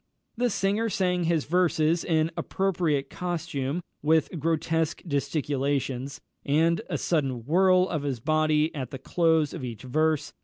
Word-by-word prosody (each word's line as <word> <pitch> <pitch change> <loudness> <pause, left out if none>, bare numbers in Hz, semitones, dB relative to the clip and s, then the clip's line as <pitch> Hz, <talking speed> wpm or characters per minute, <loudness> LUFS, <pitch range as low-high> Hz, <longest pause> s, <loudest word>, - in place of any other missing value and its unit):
The 245 +1 +1
singer 205 +2 0
sang 180 -3 0
his 165 -3 +1
verses 165 -1 +2
in 160 -1 +1
appropriate 170 -7 -1
costume, 165 -3 -3 0.2
with 160 +1 +2
grotesque 160 +1 0
gesticulations, 140 -2 -2 0.2
and 160 +3 +2
a - - -1
sudden 135 -8 -1
whirl 185 +4 +4
of 160 -6 -2
his 140 -4 -3
body 155 +3 +2
at 130 -6 -5
the 135 - -6
close 160 +1 +1
of - - -6
each 120 -3 -6
verse. 155 +4 0
155 Hz, 140 wpm, -26 LUFS, 140-175 Hz, 0.2 s, whirl